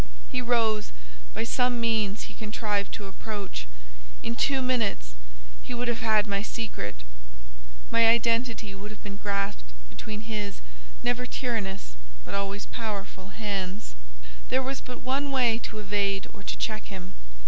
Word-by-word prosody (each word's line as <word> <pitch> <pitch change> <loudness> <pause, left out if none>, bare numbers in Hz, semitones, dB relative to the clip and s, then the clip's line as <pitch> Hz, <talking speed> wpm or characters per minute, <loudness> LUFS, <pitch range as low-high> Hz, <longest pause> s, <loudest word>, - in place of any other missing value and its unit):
He 250 - +1
rose, 225 -3 +3 0.4
by - - +1
some 245 +1 +3
means 220 -3 +2
he - - -7
contrived 210 -2 0
to 205 - -5
approach, 195 - -4 0.6
in - - 0
two 275 - +4
minutes 220 - +1 0.5
he 245 - -4
would 245 +1 0
have 235 -1 +2
had 215 -3 +5
my 200 -1 +1
secret: 155 - -3 0.9
my 230 0 +7
identity 230 -2 +4
would 200 +2 -6
have 215 - -10
been 200 -1 -4
grasped 200 - 0 0.3
between 210 - -4
his, 210 -2 -2 0.4
never 245 +1 +2
tyrannous, 205 - -1 0.3
but - - -6
always 200 +1 0
powerful 200 -4 -3
hands. 200 - -2 0.6
There 260 +1 +4
was 270 +1 -2
but 250 -1 -7
one 275 +2 +1
way 245 -4 +4
to 215 - -7
evade 200 -1 +1
or 200 - -10
to - - -2
check 215 -1 -1
him. 185 -2 -7
215 Hz, 150 wpm, -29 LUFS, 200-235 Hz, 0.9 s, my